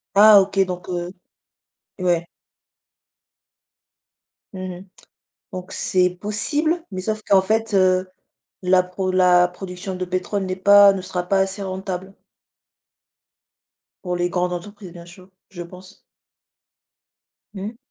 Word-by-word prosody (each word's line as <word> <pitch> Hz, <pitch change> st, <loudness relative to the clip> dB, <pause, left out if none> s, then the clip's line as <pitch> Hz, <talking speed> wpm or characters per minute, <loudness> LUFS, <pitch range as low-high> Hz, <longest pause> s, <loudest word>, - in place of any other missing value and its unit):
Ah 210 Hz, 0 st, +8 dB
OK, 195 Hz, 0 st, -2 dB
donc 180 Hz, 0 st, -7 dB
heu, 175 Hz, 0 st, -3 dB, 0.9 s
ouais. 175 Hz, -2 st, 0 dB, 2.3 s
Mmh 190 Hz, -, -8 dB, 0.2 s
mh. 190 Hz, -, -13 dB, 0.7 s
Donc 185 Hz, 0 st, -7 dB
c'est 180 Hz, -1 st, +1 dB
possible, 290 Hz, -, -2 dB
mais 185 Hz, -, -5 dB
sauf 215 Hz, +1 st, -3 dB
qu'en 195 Hz, -1 st, +5 dB
fait, 220 Hz, +3 st, -1 dB
heu, 185 Hz, -1 st, +3 dB, 0.5 s
la 185 Hz, 0 st, +4 dB
pro 185 Hz, +1 st, -4 dB
la 180 Hz, -1 st, +4 dB
production 180 Hz, +1 st, -7 dB
de 185 Hz, -, -3 dB
pétrole 185 Hz, +2 st, -2 dB
n'est 185 Hz, 0 st, -3 dB
pas 200 Hz, +1 st, +7 dB
ne 195 Hz, -, -4 dB
sera 185 Hz, -1 st, -3 dB
pas 195 Hz, -, +2 dB
assez 195 Hz, +1 st, -2 dB
rentable. 190 Hz, 0 st, -5 dB, 1.9 s
Pour 180 Hz, -2 st, -2 dB
les 175 Hz, 0 st, -1 dB
grandes 180 Hz, 0 st, -1 dB
entreprises, 195 Hz, +1 st, -8 dB
bien 170 Hz, -1 st, -11 dB
sûr, 180 Hz, +2 st, -15 dB, 0.2 s
je 175 Hz, -3 st, -9 dB
pense. 185 Hz, +3 st, -12 dB, 1.5 s
Mmh. 210 Hz, +3 st, -7 dB
185 Hz, 125 wpm, -21 LUFS, 180-200 Hz, 2.3 s, Ah